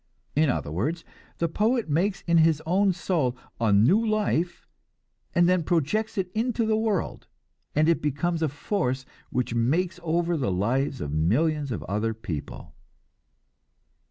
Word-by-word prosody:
In 150 Hz, 0 st, +3 dB
other 75 Hz, -, -2 dB
words, 150 Hz, -, -2 dB, 0.3 s
the 170 Hz, -, +1 dB
poet 220 Hz, +7 st, +1 dB
makes 185 Hz, +6 st, 0 dB
in 170 Hz, -1 st, +4 dB
his 160 Hz, -2 st, +4 dB
own 190 Hz, +4 st, +3 dB
soul 165 Hz, -8 st, -1 dB, 0.2 s
a 115 Hz, -2 st, +2 dB
new 120 Hz, -, +5 dB
life, 210 Hz, -6 st, 0 dB, 0.7 s
and 175 Hz, 0 st, +5 dB
then 180 Hz, 0 st, +3 dB
projects 180 Hz, +8 st, 0 dB
it 185 Hz, -2 st, -1 dB
into 230 Hz, +1 st, 0 dB
the 220 Hz, 0 st, +2 dB
world, 215 Hz, -4 st, -1 dB, 0.5 s
and 155 Hz, +1 st, +3 dB
it 170 Hz, -, +3 dB
becomes 160 Hz, +4 st, -1 dB
a 160 Hz, -, +2 dB
force 135 Hz, -3 st, -2 dB, 0.2 s
which 125 Hz, -2 st, -1 dB
makes 165 Hz, +10 st, +1 dB
over 170 Hz, +1 st, 0 dB
the 130 Hz, -11 st, 0 dB
lives 125 Hz, +8 st, 0 dB
of 70 Hz, -, -3 dB
millions 140 Hz, -, +1 dB
of 110 Hz, -, -3 dB
other 105 Hz, +3 st, -1 dB
people. 80 Hz, -5 st, -7 dB
160 Hz, 150 wpm, -26 LUFS, 125-185 Hz, 0.7 s, new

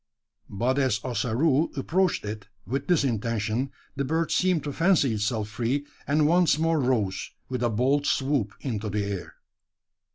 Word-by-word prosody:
But 125 Hz, +7 st, 0 dB
as 130 Hz, -7 st, +2 dB
Ossaroo 130 Hz, +5 st, +1 dB
approached 180 Hz, -, +1 dB
it 105 Hz, -1 st, -6 dB, 0.2 s
with 135 Hz, +4 st, -3 dB
this 175 Hz, -5 st, +3 dB
intention, 115 Hz, +1 st, -1 dB, 0.2 s
the 140 Hz, -, -1 dB
bird 160 Hz, +4 st, 0 dB
seemed 180 Hz, -5 st, +2 dB
to 145 Hz, -, -4 dB
fancy 165 Hz, -8 st, +3 dB
itself 105 Hz, 0 st, -1 dB
free, 120 Hz, +6 st, -1 dB, 0.2 s
and 150 Hz, +1 st, +3 dB
once 170 Hz, -1 st, +4 dB
more 165 Hz, 0 st, +2 dB
rose, 110 Hz, -8 st, 0 dB, 0.2 s
with 125 Hz, -2 st, -3 dB
a 120 Hz, -, +2 dB
bold 135 Hz, +6 st, +1 dB
swoop, 135 Hz, -7 st, 0 dB
into 110 Hz, -5 st, -2 dB
the 105 Hz, 0 st, -1 dB
air. 100 Hz, -2 st, -5 dB
130 Hz, 155 wpm, -26 LUFS, 110-150 Hz, 0.2 s, once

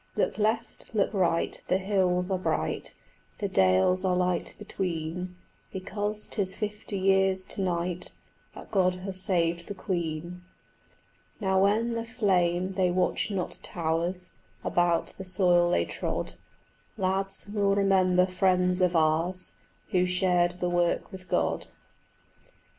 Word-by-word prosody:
Look -, -, 0 dB
left, 220 Hz, +2 st, -1 dB
look 205 Hz, 0 st, +2 dB
right, 170 Hz, -4 st, +1 dB
the 185 Hz, -, +3 dB
hills 185 Hz, -1 st, +1 dB
are 185 Hz, -, +1 dB
bright, -, -, -2 dB, 0.4 s
The 205 Hz, -, -1 dB
dales 95 Hz, -, +3 dB
are 185 Hz, -1 st, +2 dB
light 180 Hz, -1 st, 0 dB
between, 180 Hz, -3 st, -4 dB, 0.4 s
Because 205 Hz, +3 st, -3 dB
'tis 190 Hz, -3 st, -2 dB
fifty 210 Hz, -1 st, -4 dB
years 190 Hz, 0 st, +2 dB
to 195 Hz, -, -5 dB
night 175 Hz, -1 st, -2 dB, 0.4 s
That -, -, -11 dB
God 185 Hz, -3 st, +3 dB
has 185 Hz, 0 st, -5 dB
saved 170 Hz, -3 st, 0 dB
the 205 Hz, -, -5 dB
Queen. 170 Hz, -2 st, -3 dB, 1.0 s
Now, 190 Hz, -2 st, +2 dB
when 220 Hz, +4 st, +2 dB
the 230 Hz, 0 st, -2 dB
flame 190 Hz, -6 st, +1 dB
they 185 Hz, -1 st, +2 dB
watch 180 Hz, +3 st, +1 dB
not 195 Hz, -3 st, -3 dB
towers 170 Hz, +2 st, -2 dB, 0.3 s
About 175 Hz, -1 st, +1 dB
the -, -, -4 dB
soil 180 Hz, -2 st, +3 dB
they -, -, +2 dB
trod, -, -, -3 dB, 0.6 s
Lads, 195 Hz, +1 st, 0 dB
we'll 200 Hz, -2 st, +2 dB
remember 185 Hz, -2 st, +4 dB
friends 180 Hz, 0 st, +2 dB
of 180 Hz, -1 st, +3 dB
ours 165 Hz, +4 st, +1 dB, 0.4 s
Who 180 Hz, -1 st, +3 dB
shared 180 Hz, -1 st, +2 dB
the 180 Hz, -, 0 dB
work 175 Hz, +2 st, +1 dB
with 185 Hz, -1 st, -10 dB
God. -, -, 0 dB
185 Hz, 130 wpm, -28 LUFS, 175-195 Hz, 1.0 s, remember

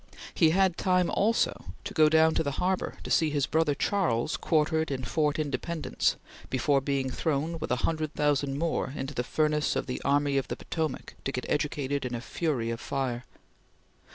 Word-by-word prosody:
He 160 Hz, -, +4 dB
had 185 Hz, +1 st, +3 dB
time 180 Hz, -1 st, +2 dB
also 225 Hz, +3 st, +1 dB, 0.2 s
to 205 Hz, +1 st, -6 dB
go 155 Hz, -4 st, +5 dB
down 160 Hz, 0 st, +5 dB
the 160 Hz, -3 st, 0 dB
harbor 180 Hz, +6 st, -1 dB
to -, -, -6 dB
see 160 Hz, -, +4 dB
his 145 Hz, -2 st, +1 dB
brother 160 Hz, -1 st, +1 dB
Charles 155 Hz, -, 0 dB
quartered 160 Hz, 0 st, +1 dB
in 130 Hz, -2 st, -3 dB
Fort 150 Hz, +2 st, 0 dB
Independence 155 Hz, +2 st, -1 dB, 0.3 s
before 135 Hz, +2 st, +2 dB
being 135 Hz, -1 st, -1 dB
thrown, 160 Hz, +4 st, -1 dB
with -, -, -4 dB
a 125 Hz, -, +2 dB
hundred 155 Hz, -2 st, -2 dB
thousand 145 Hz, -2 st, +1 dB
more, 165 Hz, -4 st, -1 dB
into 135 Hz, 0 st, -4 dB
the 125 Hz, -, -1 dB
furnace 150 Hz, +2 st, +1 dB
of -, -, -1 dB
the 125 Hz, -, -4 dB
Army 140 Hz, 0 st, +2 dB
of 135 Hz, -, -5 dB
the -, -, -4 dB
Potomac 160 Hz, -4 st, -3 dB
to 135 Hz, -, -1 dB
get 125 Hz, -2 st, -4 dB
educated 145 Hz, -1 st, -1 dB
in 125 Hz, -1 st, -3 dB
a -, -, -3 dB
fury 130 Hz, -5 st, -1 dB
of 115 Hz, -, -4 dB
fire. 130 Hz, -3 st, -2 dB
150 Hz, 180 wpm, -28 LUFS, 135-160 Hz, 0.3 s, go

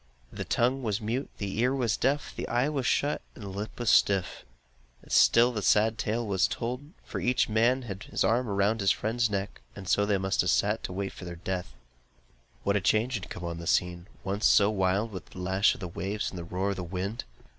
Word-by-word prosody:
The -, -, -5 dB
tongue 125 Hz, +3 st, +1 dB
was 105 Hz, -4 st, -1 dB
mute, 120 Hz, +5 st, -2 dB
the 100 Hz, +1 st, -4 dB
ear 125 Hz, +3 st, +2 dB
was 120 Hz, -5 st, +1 dB
deaf, 140 Hz, +3 st, 0 dB
the -, -, -4 dB
eye 125 Hz, +4 st, +1 dB
was 135 Hz, -5 st, -1 dB
shut, 145 Hz, +1 st, +1 dB
and 110 Hz, -, -10 dB
the 100 Hz, -, -6 dB
lip 100 Hz, +5 st, -6 dB
was 120 Hz, -2 st, +2 dB
stiff; 95 Hz, -3 st, +2 dB, 0.6 s
still 120 Hz, +2 st, +5 dB
the 110 Hz, -3 st, -3 dB
sad 110 Hz, +4 st, +3 dB
tale 115 Hz, +3 st, -1 dB
was 95 Hz, -3 st, +2 dB
told, 125 Hz, +5 st, -4 dB, 0.2 s
for -, -, -5 dB
each 125 Hz, 0 st, +2 dB
had 115 Hz, -2 st, 0 dB
his -, -, 0 dB
arm 120 Hz, +2 st, +2 dB
round 100 Hz, +2 st, +1 dB
his 100 Hz, -, +3 dB
friend's 115 Hz, +3 st, +1 dB
neck, 100 Hz, -1 st, -3 dB
and 100 Hz, -3 st, -9 dB
so 100 Hz, +2 st, +2 dB
they 100 Hz, -1 st, +2 dB
must 95 Hz, 0 st, +1 dB
have 90 Hz, -, 0 dB
sat 105 Hz, +5 st, +1 dB
to -, -, -5 dB
wait 95 Hz, +1 st, -3 dB
for 90 Hz, -1 st, -8 dB
death. 90 Hz, +1 st, -4 dB, 0.9 s
What 100 Hz, -, +1 dB
a 100 Hz, -, +2 dB
change 110 Hz, +6 st, +2 dB
had 100 Hz, -5 st, -4 dB
come 90 Hz, -, -7 dB
on 85 Hz, -1 st, -4 dB
the 85 Hz, -, -7 dB
scene, 90 Hz, -1 st, 0 dB, 0.2 s
once 100 Hz, +3 st, +1 dB
so 100 Hz, +1 st, +5 dB
wild 100 Hz, +2 st, +1 dB
with 95 Hz, -4 st, -8 dB
the -, -, -11 dB
lash 95 Hz, +3 st, +2 dB
of -, -, -12 dB
the 90 Hz, -, -3 dB
waves 95 Hz, +5 st, -3 dB
and 90 Hz, -, -7 dB
the 85 Hz, -, -6 dB
roar 95 Hz, +3 st, -1 dB
of 100 Hz, -, -4 dB
the 90 Hz, -, -3 dB
wind! 95 Hz, +5 st, -4 dB
105 Hz, 220 wpm, -28 LUFS, 95-115 Hz, 0.9 s, still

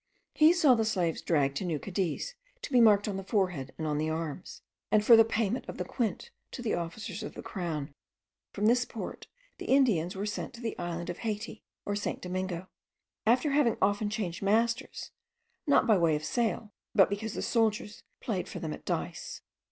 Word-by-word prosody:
He 310 Hz, +1 st, +6 dB
saw 325 Hz, -7 st, +5 dB
the 225 Hz, -2 st, +2 dB
slaves 180 Hz, -7 st, 0 dB
dragged 140 Hz, -4 st, +1 dB
to -, -, -2 dB
New 170 Hz, -4 st, -1 dB
Cadiz, 190 Hz, -, -2 dB, 0.3 s
to -, -, -5 dB
be 250 Hz, -2 st, +5 dB
marked 210 Hz, -2 st, +5 dB
on 200 Hz, -2 st, -2 dB
the 195 Hz, -, -5 dB
forehead 180 Hz, -, -1 dB
and 160 Hz, -, -3 dB
on 150 Hz, -1 st, 0 dB
the 155 Hz, +1 st, 0 dB
arms, 160 Hz, +1 st, -5 dB, 0.3 s
and 215 Hz, -1 st, +4 dB
for 235 Hz, -, +9 dB
the 225 Hz, -, +8 dB
payment 225 Hz, +1 st, -1 dB
of -, -, -6 dB
the -, -, -3 dB
quint 230 Hz, -7 st, -2 dB, 0.2 s
to 245 Hz, -, -6 dB
the 220 Hz, -, 0 dB
officers 175 Hz, +4 st, -4 dB
of -, -, -7 dB
the -, -, -8 dB
crown. 160 Hz, -6 st, -4 dB, 0.6 s
From 205 Hz, -, -2 dB
this 245 Hz, +3 st, +4 dB
port 230 Hz, -, -7 dB, 0.3 s
the -, -, -7 dB
Indians 210 Hz, -, +3 dB
were 195 Hz, +2 st, -3 dB
sent 210 Hz, +3 st, -4 dB
to -, -, -11 dB
the 230 Hz, -2 st, -3 dB
island 175 Hz, 0 st, -3 dB
of 175 Hz, -, -9 dB
Haiti 215 Hz, -1 st, -4 dB, 0.2 s
or 205 Hz, -, -1 dB
St. 205 Hz, -, -2 dB
Domingo, 185 Hz, 0 st, -4 dB, 0.6 s
after 250 Hz, +6 st, +4 dB
having 275 Hz, -6 st, +3 dB
often 205 Hz, +2 st, +1 dB
changed 205 Hz, -6 st, -3 dB
masters, 230 Hz, +5 st, 0 dB, 0.6 s
not 285 Hz, -, +5 dB
by 215 Hz, -5 st, +4 dB
way 165 Hz, -2 st, +3 dB
of 150 Hz, +1 st, -4 dB
sale, 220 Hz, +1 st, -1 dB, 0.2 s
but 195 Hz, -3 st, +7 dB
because 210 Hz, +2 st, -4 dB
the -, -, -3 dB
soldiers 220 Hz, -2 st, 0 dB, 0.2 s
played -, -, -2 dB
for -, -, -6 dB
them -, -, -4 dB
at -, -, -10 dB
dice. -, -, -4 dB
205 Hz, 200 wpm, -30 LUFS, 175-230 Hz, 0.6 s, for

